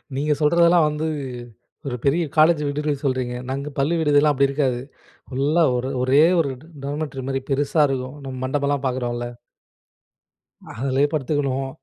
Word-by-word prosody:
நீங்க 150 Hz, +2 st, +1 dB
சொல்றதெல்லாம் 170 Hz, +2 st, +5 dB
வந்து 150 Hz, +1 st, -2 dB, 0.8 s
ஒரு 125 Hz, -, -2 dB
பெரிய 160 Hz, +5 st, +3 dB
காலேஜ் 155 Hz, 0 st, +5 dB
விடுதில 150 Hz, +1 st, -1 dB
சொல்றீங்க. 130 Hz, -3 st, -1 dB
நாங்க 140 Hz, +2 st, -3 dB
பள்ளி 145 Hz, +5 st, +1 dB
விடுதிலாம் 150 Hz, -1 st, +4 dB
அப்டி 140 Hz, +1 st, +3 dB
இருக்காது. 135 Hz, -3 st, 0 dB, 0.5 s
ஃபுல்லா 145 Hz, +6 st, +2 dB
ஒரு 130 Hz, +2 st, -3 dB
ஒரே 135 Hz, +4 st, +5 dB, 0.2 s
ஒரு 140 Hz, -4 st, -2 dB
ட -, -, -15 dB, 0.2 s
டார்மிட்டரி 145 Hz, -2 st, -4 dB
மாரி 135 Hz, 0 st, -1 dB
பெருசா 145 Hz, +3 st, +2 dB
இருக்கும். 130 Hz, 0 st, -3 dB
நம்ம 135 Hz, -1 st, -6 dB
மண்டபம்லாம் 140 Hz, +1 st, -1 dB
பார்க்குறோம்ல. 120 Hz, -1 st, -2 dB, 1.5 s
அதுலயே 135 Hz, +3 st, +1 dB
படுத்துக்கணும், 135 Hz, -2 st, -1 dB
140 Hz, 135 wpm, -22 LUFS, 130-150 Hz, 1.5 s, சொல்றதெல்லாம்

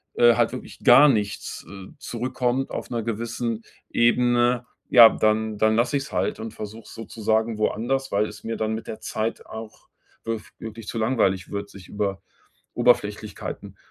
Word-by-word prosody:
äh, 120 Hz, -1 st, +6 dB
halt 120 Hz, -1 st, +2 dB
wirklich 130 Hz, -, -9 dB
gar 135 Hz, +5 st, +8 dB
nichts, 105 Hz, -5 st, -2 dB
äh, 95 Hz, -1 st, -10 dB
zurückkommt 125 Hz, +2 st, -2 dB
auf -, -, -5 dB
'ner 120 Hz, -2 st, -2 dB
gewissen 115 Hz, 0 st, -3 dB, 0.3 s
Ebene, 120 Hz, +1 st, +3 dB, 0.2 s
ja, 115 Hz, -3 st, +10 dB
dann 110 Hz, 0 st, 0 dB
dann 110 Hz, +1 st, +3 dB
lasse 120 Hz, +4 st, +2 dB
ich 135 Hz, -, -3 dB
es -, -, -11 dB
halt 95 Hz, +1 st, -1 dB
und 110 Hz, 0 st, -6 dB
versuche 110 Hz, +1 st, -8 dB
sozusagen 110 Hz, 0 st, -1 dB
woanders, 135 Hz, +5 st, -1 dB
weil 105 Hz, +2 st, +2 dB
es -, -, -11 dB
mir 115 Hz, 0 st, -3 dB
dann 110 Hz, 0 st, -1 dB
mit 110 Hz, -, -6 dB
der 110 Hz, -, -7 dB
Zeit 110 Hz, +1 st, -3 dB
auch 110 Hz, -1 st, -10 dB, 0.4 s
wirf 115 Hz, -1 st, -4 dB
wirklich 110 Hz, -1 st, -8 dB
zu 115 Hz, -, -4 dB
langweilig 105 Hz, -5 st, +1 dB
wird, 100 Hz, 0 st, -4 dB
sich 95 Hz, -2 st, -13 dB
über 100 Hz, -2 st, -2 dB, 0.5 s
Oberflächlichkeiten -, -, -1 dB
115 Hz, 165 wpm, -24 LUFS, 110-120 Hz, 0.5 s, ja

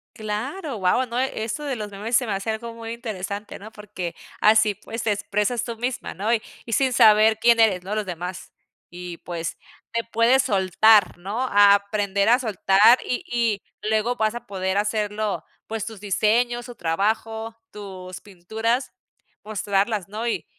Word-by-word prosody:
Claro, 250 Hz, -, -4 dB
guau, 195 Hz, +7 st, +2 dB
no, 235 Hz, +2 st, -2 dB
eso 255 Hz, +1 st, -2 dB
de 275 Hz, -3 st, -2 dB
los 210 Hz, -3 st, -6 dB
memes 220 Hz, +4 st, 0 dB
se 255 Hz, -, 0 dB
me 215 Hz, -, -3 dB
hace 195 Hz, +3 st, -3 dB
algo 230 Hz, +1 st, -4 dB
muy 230 Hz, 0 st, -7 dB
interesante, 210 Hz, -3 st, -6 dB
¿no? 215 Hz, +2 st, -11 dB
Porque 205 Hz, -5 st, -7 dB, 0.3 s
así, 215 Hz, -1 st, +5 dB
pues, 225 Hz, +4 st, -7 dB
te 220 Hz, -, +1 dB
expresas 210 Hz, +3 st, -1 dB
tú 230 Hz, -2 st, -5 dB
misma, 245 Hz, +2 st, -3 dB
¿no?, 210 Hz, +6 st, 0 dB
y 225 Hz, -, +1 dB, 0.2 s
y 230 Hz, -, -5 dB
sin 260 Hz, +2 st, +2 dB
saber 220 Hz, -1 st, +6 dB
quién 235 Hz, 0 st, +5 dB
eres, 195 Hz, -5 st, +3 dB
¿no?, 195 Hz, -, -4 dB
los 215 Hz, -1 st, -1 dB
demás. 180 Hz, +1 st, -6 dB, 0.4 s
Y, 175 Hz, -1 st, -8 dB
pues, 170 Hz, -2 st, -5 dB, 0.3 s
te 230 Hz, 0 st, -1 dB
puedes 230 Hz, +3 st, +3 dB
soltar, 200 Hz, -1 st, +4 dB
¿no?, 205 Hz, +7 st, -4 dB
a 205 Hz, -4 st, +6 dB
aprender 200 Hz, 0 st, 0 dB
a 245 Hz, +2 st, +5 dB
soltar 220 Hz, 0 st, +5 dB
y 250 Hz, -, -2 dB
y 230 Hz, -4 st, 0 dB, 0.3 s
luego 220 Hz, +3 st, +1 dB
vas 220 Hz, -1 st, 0 dB
a 240 Hz, -, -8 dB
poder 190 Hz, 0 st, -2 dB
hacerlo, 210 Hz, 0 st, -1 dB, 0.2 s
pues, 225 Hz, -1 st, -4 dB
tus 220 Hz, -3 st, -8 dB
diseños, 230 Hz, +4 st, +1 dB
tu 245 Hz, -, -9 dB
trabajo, 220 Hz, +6 st, -1 dB, 0.2 s
tus 185 Hz, -3 st, -9 dB
pinturas, 220 Hz, +4 st, -2 dB, 0.5 s
mostrarlas, 205 Hz, -1 st, -1 dB
¿no? 220 Hz, +3 st, -4 dB
Y -, -, -2 dB
215 Hz, 170 wpm, -23 LUFS, 200-230 Hz, 0.5 s, saber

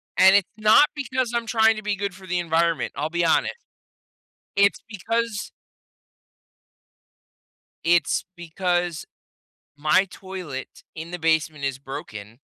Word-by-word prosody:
and 190 Hz, +1 st, +7 dB
it's 195 Hz, -, 0 dB
not 215 Hz, +6 st, +6 dB
because 260 Hz, -3 st, -2 dB
I'm 235 Hz, -1 st, -1 dB
trying 225 Hz, -1 st, +3 dB
to 215 Hz, -, -6 dB
be 210 Hz, -1 st, -1 dB
good 200 Hz, -1 st, -3 dB
for 190 Hz, 0 st, -13 dB
the 180 Hz, 0 st, -1 dB
environment, 165 Hz, -2 st, 0 dB
I'll 155 Hz, +2 st, -2 dB
be 170 Hz, 0 st, 0 dB
honest. 160 Hz, -, +2 dB, 1.0 s
It's 200 Hz, 0 st, +3 dB
because 225 Hz, +1 st, -2 dB, 2.3 s
it's 170 Hz, -3 st, +2 dB
because 175 Hz, 0 st, -2 dB, 0.7 s
my 155 Hz, +6 st, +3 dB
toilet 180 Hz, -10 st, -8 dB
in 165 Hz, +2 st, -7 dB
the 180 Hz, -, -5 dB
basement 160 Hz, -3 st, 0 dB
is 135 Hz, -1 st, -2 dB
broken, 115 Hz, -4 st, -9 dB
175 Hz, 125 wpm, -24 LUFS, 160-205 Hz, 2.3 s, and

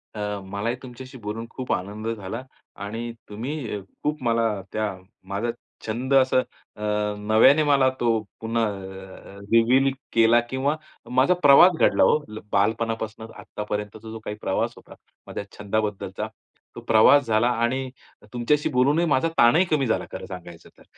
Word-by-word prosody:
अ, -, -, -6 dB, 0.2 s
मलाही 100 Hz, +5 st, -3 dB
तुमच्याशी 130 Hz, +1 st, -10 dB
बोलून 110 Hz, 0 st, -5 dB
खूप 130 Hz, -1 st, -6 dB
आनंद 105 Hz, +4 st, -4 dB
झाला 115 Hz, +1 st, -4 dB, 0.4 s
आणि 115 Hz, +3 st, -5 dB, 0.2 s
तुम्ही 120 Hz, +1 st, -4 dB, 0.2 s
खूप 150 Hz, -1 st, -1 dB
मला 115 Hz, -1 st, +2 dB, 0.2 s
त्या 110 Hz, -3 st, -2 dB, 0.3 s
माझा 100 Hz, +5 st, -2 dB, 0.4 s
छंद 125 Hz, +5 st, -2 dB
असं 130 Hz, -1 st, +5 dB, 0.4 s
अ, -, -, -12 dB, 0.4 s
नव्याने 110 Hz, +8 st, +5 dB
मला 140 Hz, -3 st, +4 dB
तो 115 Hz, -2 st, +2 dB, 0.2 s
पुन्हा 115 Hz, +1 st, 0 dB
अ, 95 Hz, -1 st, -8 dB
रिव्हील 125 Hz, +4 st, +4 dB, 0.2 s
केला 115 Hz, +1 st, +5 dB
किंवा 135 Hz, +3 st, 0 dB, 0.4 s
माझा 130 Hz, +7 st, +4 dB
प्रवास 145 Hz, +6 st, +8 dB
घडला -, -, +4 dB
ओ. -, -, +4 dB, 0.3 s
बालपणापासून 110 Hz, +1 st, -1 dB
आत्तापर्यंतचा 105 Hz, +1 st, -6 dB
जो 110 Hz, -, -7 dB
काही 105 Hz, -, -4 dB
प्रवास -, -, -1 dB
होता -, -, -15 dB, 0.3 s
माझ्या -, -, -5 dB
छंदाबद्दलचा, 105 Hz, -1 st, -2 dB, 0.5 s
तो -, -, -7 dB
प्रवास 130 Hz, +6 st, +6 dB
झाला 110 Hz, +2 st, +3 dB
आणि 125 Hz, +3 st, 0 dB, 0.4 s
तुमच्याशी 145 Hz, +5 st, +1 dB
बोलूनही 145 Hz, +6 st, +3 dB
माझा 155 Hz, -1 st, +2 dB
ताणही 135 Hz, +10 st, +5 dB
कमी 150 Hz, -7 st, +1 dB
झाला, 110 Hz, -, 0 dB
खरं -, -, -6 dB
सांगायचं 85 Hz, -2 st, -10 dB
तर. -, -, -18 dB
115 Hz, 140 wpm, -24 LUFS, 105-130 Hz, 0.5 s, प्रवास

